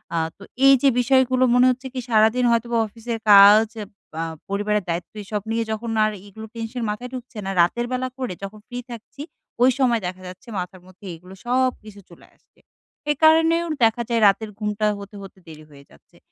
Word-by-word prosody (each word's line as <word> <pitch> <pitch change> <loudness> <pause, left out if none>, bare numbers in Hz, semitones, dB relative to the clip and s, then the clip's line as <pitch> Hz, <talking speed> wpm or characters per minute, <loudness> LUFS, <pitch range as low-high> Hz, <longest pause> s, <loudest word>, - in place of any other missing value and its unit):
আ - - 0 0.2
তো 200 - -14 0.2
এই 275 - +8
যে 275 - +5
বিষয়গুলো 260 0 +3
মনে 250 +1 +5
হচ্ছে 255 +1 -3
কি 255 - -4
সারাদিন 220 +3 +3
হয়তোবা 235 0 0
অফিসের 230 +1 -6
কাজ, 205 +2 +8 0.5
আ - - -1 0.3
পরিবারের 205 0 -1
দায়িত্ব 170 +1 -4
এইসব 210 +1 -4
নিয়ে 230 0 0
যখন 225 +1 -4
আর 215 - +1 0.2
এগুলো 220 +2 -10
টেনশন 230 +1 -5
মাথায় 245 +4 -5
ঢুকছে 245 -3 -8
না, 195 - -2
রাতের 240 +8 +1
বেলা 255 0 -1
করে 255 -8 -4
যখন 210 +2 -8
ফ্রি 245 - -6
থাকছি, 235 +4 -10 0.4
ওই 260 - +6
সময় 240 -4 +2
দেখা 185 +1 -7
যাচ্ছে 185 +8 -12
মাথার 180 0 -7
মধ্যে 185 +2 -17
এগুলো 180 +3 -14
সবকিছু 245 -5 -1
চলে 170 - -17
আসছে। - - -35 0.5
এই 295 - +2
কারণেও 325 +2 +4 0.2
দেখা 225 +1 +3
যায় 230 -1 +1
রাতের 210 +2 +1
ঘুমটা 210 0 -2
হতে, 200 +1 -11
হতে 195 -1 -12
দেরি 155 -1 -12
হয়ে 140 -1 -16
যাচ্ছে। - - -23
225 Hz, 190 wpm, -22 LUFS, 200-250 Hz, 0.5 s, এই